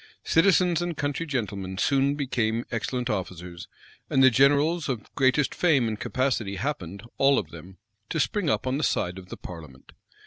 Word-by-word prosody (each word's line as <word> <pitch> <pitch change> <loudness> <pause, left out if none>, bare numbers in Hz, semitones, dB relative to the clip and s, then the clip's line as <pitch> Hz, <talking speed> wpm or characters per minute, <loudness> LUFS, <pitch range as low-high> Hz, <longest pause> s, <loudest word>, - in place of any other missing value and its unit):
Citizens 175 -1 +3
and 175 -3 -3
country 145 +3 -2
gentlemen 100 -8 -3
soon 140 +5 +2
became 120 -5 -1
excellent 120 +1 -2
officers; 90 -5 -5 0.4
and 135 - +3
the 130 - +7
generals 145 +6 +3
of 120 -5 -5
greatest 135 0 +2
fame 145 -9 +2
and 110 -1 -3
capacity 120 -7 -1
happened, 100 - -4 0.2
all 135 0 +5
of 85 -6 -3
them, 90 +3 -12 0.3
to 165 - -2
spring 165 +5 0
up 110 -1 0
on 130 +2 -1
the - - -2
side 90 -6 0
of 90 -1 -14
the - - -7
parliament. 80 -7 -11
130 Hz, 170 wpm, -26 LUFS, 100-145 Hz, 0.4 s, the